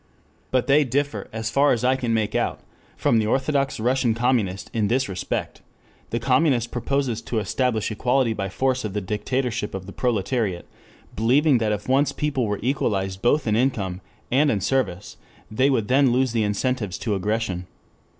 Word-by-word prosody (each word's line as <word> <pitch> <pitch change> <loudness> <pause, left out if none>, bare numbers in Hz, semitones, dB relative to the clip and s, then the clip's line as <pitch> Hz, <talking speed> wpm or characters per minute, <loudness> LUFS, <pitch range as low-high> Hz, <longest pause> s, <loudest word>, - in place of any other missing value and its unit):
But 130 -1 +1
they 145 +2 +5
differ, 140 +3 -2
as 110 0 -3
far 145 +1 +4
as 120 - -2
I 130 +1 +3
can 125 -3 -2
make 110 -2 0
out, - - -1 0.4
from 115 - +3
the 110 - 0
orthodox 135 +2 0
Russian 120 0 +1
communist 115 -6 0
in 110 -3 +1
this 130 +5 +1
respect: 95 -2 -4 0.5
The 115 - -1
communist 125 -1 +2
proposes 125 -1 -1
to 115 - -4
establish 110 +1 0
equality 125 +2 +1
by 100 -2 -3
force 130 +5 0
of 105 -3 -4
the 105 - -2
dictatorship 105 +2 -2
of 95 -1 -6
the 100 - -9
proletariat, 110 -5 -1 0.5
believing 130 +5 +3
that 110 -2 0
if 105 -1 -3
once 140 +2 +2
people 140 -6 -1
were 105 0 -1
equalized 95 -7 -1
both 145 +6 +2
in 110 -2 +1
income 100 -7 0 0.3
and 145 +4 +4
in 105 - +1
service, 100 -4 -1 0.3
they 130 +6 +2
would 115 -6 +1
then 135 0 +4
lose 130 0 +2
the 115 -1 0
incentives 105 -1 -1
to 110 - -2
aggression. 100 -2 -2
120 Hz, 175 wpm, -23 LUFS, 105-130 Hz, 0.5 s, they